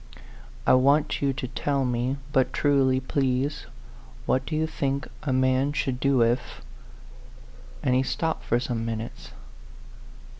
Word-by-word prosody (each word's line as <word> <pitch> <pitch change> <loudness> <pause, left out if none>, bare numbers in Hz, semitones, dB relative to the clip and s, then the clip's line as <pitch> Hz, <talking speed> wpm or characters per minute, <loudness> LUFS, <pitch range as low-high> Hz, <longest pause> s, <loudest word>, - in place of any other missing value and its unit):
I - - +5
want 140 +4 +3
you 140 -1 +2
to 130 - -4
tell 135 +2 -1
me 125 +2 -1 0.2
but 130 -3 +3
truly, 135 -3 +2
please 130 +1 -1 0.6
what 130 +1 0
do 155 - -2
you 155 +1 +1
think 140 -3 -2
a 145 - -2
man 130 +2 +2
should 135 -3 -1
do 135 -2 +3
if 120 +2 -1 0.6
" 60 0 -20
and 125 - +2
he 130 - +4
stopped 160 +4 -2
for 120 - +1
some 120 -2 -3
minutes. 110 - -5
130 Hz, 145 wpm, -26 LUFS, 125-140 Hz, 0.6 s, I